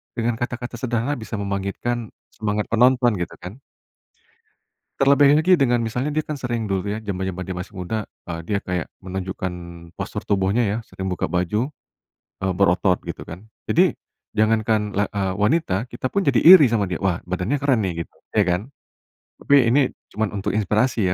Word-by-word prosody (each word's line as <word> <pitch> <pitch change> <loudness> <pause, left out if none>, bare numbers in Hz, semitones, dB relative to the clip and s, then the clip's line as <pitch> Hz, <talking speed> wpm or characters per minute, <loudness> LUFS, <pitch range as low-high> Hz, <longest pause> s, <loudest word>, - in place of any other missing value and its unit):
dengan 120 -1 0
kata-kata 120 0 -4
sederhana 120 +2 0
bisa 110 - -5
membangkitkan, 100 +4 -2 0.3
semangat 105 -1 -1
penonton 125 +1 +4
gitu 90 - -4
kan. 95 +8 -8 1.4
Terlebih 140 +1 +6
lagi 180 +2 +5
dengan 120 -4 +2
misalnya 125 +6 -2
dia 155 - +1
kan 150 -1 -5
sering 120 -4 -3
dulu 95 -1 -1
ya, 110 - -5
zaman-zaman 95 -3 -4
dia 95 0 -5
masih 90 +4 -7
muda, 100 +3 -3 0.2
eee, 85 -1 -3
dia 100 +2 0
kayak 90 -3 -3
menunjukkan 95 -1 -4 0.4
postur - - -4
tubuhnya 100 +3 +1
ya, 105 - -1
sering 95 0 -5
buka 90 - -1
baju, 105 - -1 0.7
eee, 95 - +1
berotot 90 0 +2
gitu - - -6
kan. 85 +2 -9 0.2
Jadi, - - +3 0.4
jangankan 110 -1 +2
la 100 0 0
eee, 95 -2 -2
wanita, 105 - 0
kita 125 +2 -4
pun 200 - +2
jadi 130 -4 +3
iri 170 -5 +10
sama 115 -3 +1
dia, 90 -3 -4
"Wah 95 -3 -1
badannya 90 +9 -1
keren 135 -4 +2
nih" 85 -4 -2
gitu, - - -30 0.2
ya 105 - +5
kan? 90 -1 +1 0.8
Tapi 145 - +2 0.2
ini, 135 +4 +5 0.3
cuman 110 0 -1
untuk 100 -1 -2
inspirasi 110 +1 +1
105 Hz, 165 wpm, -22 LUFS, 95-120 Hz, 1.4 s, iri